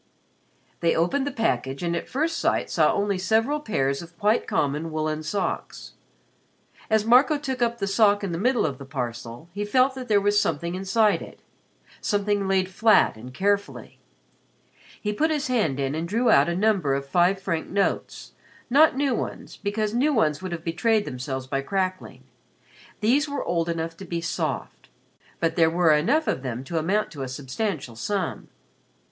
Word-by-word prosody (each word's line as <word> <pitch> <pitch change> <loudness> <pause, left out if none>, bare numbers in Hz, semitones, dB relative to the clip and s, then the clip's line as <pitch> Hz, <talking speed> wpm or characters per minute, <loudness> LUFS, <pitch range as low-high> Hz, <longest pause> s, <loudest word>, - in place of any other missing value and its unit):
They 170 -1 +2
opened 265 +13 +1
the - - -1
package 135 - -1
and 170 0 0
at 170 - -5
first 320 +5 -1
sight - - 0
saw - - +3
only 200 -2 0
several 225 +10 +1
pairs 140 - -1
of 170 0 -13
quite 210 +4 +1
common 150 +3 -1
woolen 155 0 -2
socks. 195 +6 -4 1.0
As 220 -1 +2
Marco 255 +6 +5
took 265 -3 -4
up 235 0 +1
the 200 - -2
sock 205 0 +3
in 195 - -2
the 165 - -3
middle 250 +3 +2
of 140 -3 -3
the 140 - -8
parcel, 120 0 -6
he 205 +2 -3
felt 255 +5 +3
that 260 -1 -7
there 210 -3 +4
was 205 +1 +3
something 170 +2 -2
inside 200 +3 +2
it - - -11 0.6
something 205 -1 0
laid 190 -1 +2
flat 220 - +4
and 120 +4 -10
carefully. 200 +8 -2 1.0
He 210 0 -2
put 315 +9 +1
his 300 -2 -1
hand 205 - +1
in 135 0 -1
and 160 +2 -3
drew 230 +6 +2
out 140 +4 +5
a 170 - -1
number 190 -8 +2
of 140 0 -3
five 180 +5 +2
franc 170 -4 -3
notes 200 +1 -2 0.4
not 290 0 +5
new 275 -2 +1
ones, - - -5
because 210 +1 -2
new 270 +6 +2
ones 155 -6 +1
would 185 -1 -5
have 170 -2 -5
betrayed 210 +6 +1
themselves 130 -1 -5
by 135 +1 -2
crackling. 185 +4 -3 0.8
These 275 +8 +2
were 285 -1 -3
old 170 -1 0
enough 165 0 -3
to 195 - -9
be 170 -1 -3
soft. 170 - -4 0.5
But 165 -1 0
there 165 -2 +4
were 165 -1 +3
enough 275 - +2
of - - 0
them 125 -1 -4
to 165 +4 -2
amount 200 +7 0
to 145 - -8
a 135 - -3
substantial 135 - -4
sum. 190 - -3
190 Hz, 180 wpm, -25 LUFS, 155-220 Hz, 1.0 s, Marco